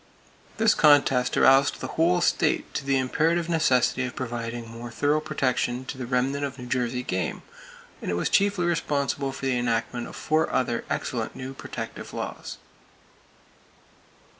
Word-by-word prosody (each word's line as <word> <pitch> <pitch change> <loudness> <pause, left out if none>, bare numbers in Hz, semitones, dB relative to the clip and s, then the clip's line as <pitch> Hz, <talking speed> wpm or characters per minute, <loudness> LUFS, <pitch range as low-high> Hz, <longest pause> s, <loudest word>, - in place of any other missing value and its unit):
This 225 0 +4
contest 140 -4 +4
aroused 135 +1 +5
the - - -5
whole 175 +2 +2
state 160 -2 +1
to - - -3
the 135 0 +1
imperative 160 +6 +1
necessity 130 -6 +2
of 125 - -4
providing 115 -2 -4
more 115 +1 -8
thorough 145 +5 +1
protection 130 -4 -1
for - - -6
the 125 - -4
remnant 135 +3 0
of 140 -1 -4
New 125 - -8
Jersey 125 0 -1
game, 90 -7 -3 0.6
and - - -4
it 90 - 0
was 85 - 0
chiefly 200 -3 +2
responsible 140 -5 0
for 135 - -6
the 130 -2 +1
enactment 120 0 -1
of - - -10
four 155 +1 0
other 120 -2 0
excellent - - -3
new 130 +1 -6
protective - - -7
laws. - - -5
130 Hz, 155 wpm, -26 LUFS, 125-150 Hz, 0.6 s, aroused